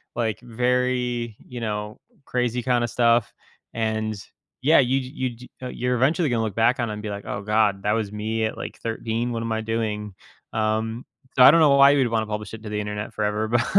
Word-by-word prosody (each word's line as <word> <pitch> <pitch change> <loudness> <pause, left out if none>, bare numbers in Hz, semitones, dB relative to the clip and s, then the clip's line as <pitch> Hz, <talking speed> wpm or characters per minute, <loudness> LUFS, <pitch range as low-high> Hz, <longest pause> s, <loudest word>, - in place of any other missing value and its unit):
like, 110 -3 -1
very, 125 -1 0
you 125 -1 -7
know, 105 -1 -4 0.3
crazy 125 -1 -1
kinda 120 -2 +2
stuff, 115 -2 +2 0.4
and, 110 -1 -1 0.5
yeah, 155 +2 +6
you 135 +1 +3
j 130 - -5
you 130 -2 -3
j 125 +2 -13
eh, 125 - -4
you're 125 0 -1
eventually 150 +5 +2
gonna 115 -2 +1
look 105 -3 -3
back 115 +3 +3
on 120 -2 0
and 105 0 -5
be 105 - -4
like, 100 0 -6
"Oh 100 - -3
god, 105 -2 +2
that 105 - +1
was 110 -3 -1
me 110 +1 -2
at, 110 - -3
like, - - -7
13. 115 +1 -2
What 115 0 -3
am 115 - -3
I 110 0 0
doing?" 105 -3 -3 0.4
Um, 110 +2 -1 0.3
I 125 +1 +10
don't 165 0 +5
know 150 - +6
why 140 0 +8
you'd 135 -4 +3
wanna 110 -1 0
publish 105 -1 -5
it 110 - -8
to 105 - -6
the 105 0 -2
Internet 105 +1 -5
forever, 105 +1 -1
but 120 +2 +2
115 Hz, 215 wpm, -24 LUFS, 110-125 Hz, 0.5 s, I